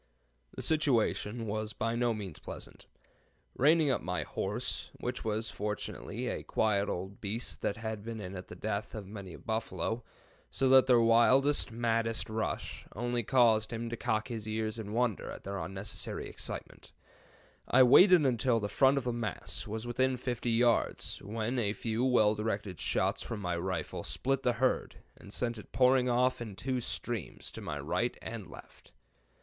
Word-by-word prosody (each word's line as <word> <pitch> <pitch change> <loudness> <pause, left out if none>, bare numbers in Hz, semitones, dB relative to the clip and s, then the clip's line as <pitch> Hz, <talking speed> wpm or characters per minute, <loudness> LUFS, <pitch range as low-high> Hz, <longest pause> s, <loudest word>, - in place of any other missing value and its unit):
"The - - -4
situation 120 -6 +1
was 110 0 -3
by 115 - -1
no 120 0 +2
means 100 -7 -5
pleasant. - - -10 0.7
Reining 150 +1 +4
up 125 - 0
my 90 0 -2
horse - - -3
(which 125 +1 -4
was 110 0 -2
fortunately 105 0 -4
a - - -2
quiet 100 -2 +1
old 95 +3 -5
beast 110 +4 -3
that 100 - -1
had 110 -2 -4
been 115 0 -5
in 95 -2 -6
at 90 - -7
the - - -9
death 105 0 -3
of 105 -2 -5
many 100 -3 -8
a - - -9
buffalo, 110 0 -2 0.5
so 135 - +1
that 130 0 +7
their 125 -2 +6
wildest, 125 +4 +4
maddest 115 -1 0
rush 110 0 -3
only 120 +2 0
caused 115 -2 +4
him 115 0 -4
to - - -1
cock 110 0 -1
his 110 -3 -5
ears 110 +1 -2
in 105 -2 -6
wonder 120 -2 0
at - - -8
their 100 0 -4
unnecessary 95 +5 -4
excitement), - - -7 0.8
I 130 +1 +7
waited 175 +6 +7
until 125 -2 +2
the 105 -1 -3
front 135 +6 +4
of 135 - 0
the 120 -1 -1
mass 115 -4 -4
was 110 +2 -4
within 130 +2 +1
50 120 -1 -2
yards, 115 +1 +2
when 115 +4 -2
a 105 -3 +1
few 115 +2 -2
well 120 -5 +4
directed 105 -4 -3
shots - - +1
from 115 - -5
my 90 -3 -1
rifle 95 +2 -3
split 135 +1 -1
the 125 -2 +2
herd, 130 +2 0 0.2
and 100 - -13
sent 120 0 -2
it - - -13
pouring 125 0 +4
off 125 +1 +2
in 110 -4 -6
two 130 +3 -2
streams 115 -4 -5
to - - -8
my - - -4
right - - -1
and - - -6
left. - - -14
115 Hz, 175 wpm, -31 LUFS, 105-125 Hz, 0.8 s, that